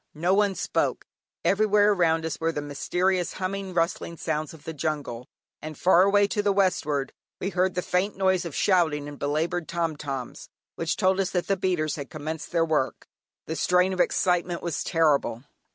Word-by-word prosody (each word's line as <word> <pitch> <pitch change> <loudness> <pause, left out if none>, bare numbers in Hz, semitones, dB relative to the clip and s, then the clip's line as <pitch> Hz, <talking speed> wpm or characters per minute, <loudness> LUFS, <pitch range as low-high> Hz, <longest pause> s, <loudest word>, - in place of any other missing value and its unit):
No 175 +5 +1
one 200 -1 +2
spoke. - - -1 0.4
Everywhere 210 0 +4
around 165 -4 +2
us 160 - -3
were 165 0 +1
the 150 - -4
mysterious 175 +5 -1
humming, 190 0 -4
rustling 170 0 -1
sounds 155 -1 -2
of 160 -3 -14
the 160 - -6
jungle, 145 -5 -3 0.3
and 155 -1 -7
far 180 -1 +5
away 200 +1 +5
to 205 - 0
the 205 0 +2
westward 155 -8 0 0.3
we 195 - -2
heard 185 0 +1
the 180 - -1
faint 190 +3 0
noise 190 -2 +2
of 170 -5 -6
shouting 160 -7 +2
and 145 -1 -9
belaboured 160 +4 -1
"tom 165 -2 -1
toms," 135 -4 -6 0.2
which 165 +2 -2
told 190 +1 +2
us 190 -2 +1
that 180 -1 -1
the 195 - +1
beaters 180 -5 -1
had 140 -2 -6
commenced 155 0 -6
their 165 -2 +2
work. 150 -7 -1 0.4
The 160 - -4
strain 180 +3 +2
of 185 - -5
excitement 180 -1 +1
was 170 -3 -2
terrible. 150 -8 +1
170 Hz, 185 wpm, -26 LUFS, 155-185 Hz, 0.4 s, far